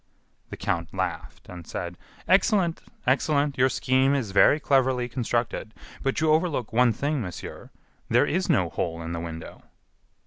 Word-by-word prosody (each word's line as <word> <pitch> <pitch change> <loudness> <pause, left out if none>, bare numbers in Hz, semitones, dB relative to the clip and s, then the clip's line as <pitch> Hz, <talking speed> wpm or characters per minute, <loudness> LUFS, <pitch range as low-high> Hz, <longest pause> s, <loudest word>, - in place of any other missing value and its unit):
The - - -7
count 85 0 -2
laughed - - -4
and 90 -2 -10
said: 85 0 -5 0.3
"Excellent! 190 -3 +3 0.2
excellent! 140 +1 +1
Your 130 +1 +5
scheme 130 +2 +2
is 120 -8 -2
very 120 +9 +5
cleverly 130 -3 +2
constructed, 120 -2 -2 0.3
but 135 +2 -1
you 155 -1 +3
overlook 155 -8 0
one 125 +1 +4
thing, 140 +5 -1
monsieur, 90 -5 -7 0.4
there - - +4
is 185 +3 -1
no 95 - +3
hole 85 +1 -3
in 80 - -5
the 85 - -3
window." 80 -1 -8
130 Hz, 150 wpm, -26 LUFS, 95-145 Hz, 0.4 s, Your